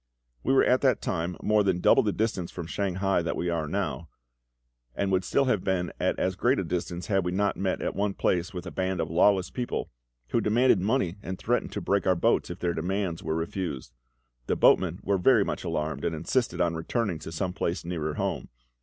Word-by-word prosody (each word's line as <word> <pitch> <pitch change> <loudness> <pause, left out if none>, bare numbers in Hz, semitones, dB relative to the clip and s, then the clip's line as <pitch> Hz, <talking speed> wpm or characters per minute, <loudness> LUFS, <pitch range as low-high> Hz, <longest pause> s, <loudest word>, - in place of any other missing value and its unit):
We - - 0
were 135 - +5
at 125 - +3
that 130 -2 +3
time 85 -1 -2
more 105 -1 +3
than 95 -3 +1
double - - +5
the - - 0
distance 105 -6 -1
from 85 - -6
Shanghai 95 +1 0
that 85 - -2
we 85 - -1
are 80 -2 -1
now, 90 -3 -3 0.9
and 100 -1 -1
would 95 0 +2
still 140 +9 +2
have 110 -8 +1
been 90 -2 0
at - - 0
as 95 0 0
great 125 +8 +2
a - - 0
distance 85 +1 -3
had 95 -3 +1
we 90 - -1
not 100 +2 +1
met 95 -1 -2
at - - -2
one 100 0 -1
place 85 -1 0
with 90 -2 -6
a 90 - -6
band 95 -1 -2
of 80 -1 -2
lawless 95 +2 +3
people, 125 -1 -3 0.4
who 115 - +1
demanded 115 0 +3
money 100 -3 0
and 95 -2 -5
threatened 120 +2 -1
to - - -3
break 100 -2 0
our 95 - +4
boats 85 - +1
if 85 - -5
their 85 -1 -1
demands 90 +1 -2
were 80 0 -2
refused. 80 -7 -4 0.5
The - - +1
boatmen 90 -1 +3
were 100 -1 +1
very 110 +1 +5
much - - -3
alarmed, 80 -4 -2
and 80 - -1
insisted 120 +10 -1
on 85 -1 +2
returning 85 +2 -2
to 80 - -8
some 90 +3 -2
place 85 -1 -2
nearer 80 -3 -3
home. - - -2
95 Hz, 215 wpm, -27 LUFS, 85-100 Hz, 0.9 s, were